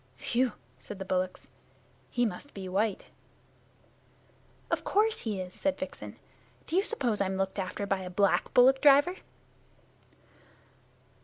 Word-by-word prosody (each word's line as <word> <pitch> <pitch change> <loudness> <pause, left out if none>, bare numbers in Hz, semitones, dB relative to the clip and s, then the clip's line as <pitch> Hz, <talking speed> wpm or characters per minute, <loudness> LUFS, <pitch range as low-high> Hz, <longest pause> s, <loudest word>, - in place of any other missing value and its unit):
"Phew!" 245 - 0 0.3
said 190 +11 -9
the 190 - -6
bullocks. 185 0 -2 0.6
"He 245 0 +1
must 285 +6 -6
be 190 -2 -6
white!" 200 +2 0 1.7
"Of - - 0
course 435 +2 +2
he 210 -4 -3
is," 185 0 -6
said 290 -1 -1
Vixen. 280 +1 -7 0.5
"Do - - -4
you 380 - +5
suppose 255 - -1
I'm 190 -1 0
looked 195 +1 -2
after 190 +2 -3
by 195 -1 0
a 185 -1 -6
black 200 +2 +2
bullock 265 +2 +6
driver?" 290 +6 +6
210 Hz, 135 wpm, -29 LUFS, 190-280 Hz, 1.7 s, bullock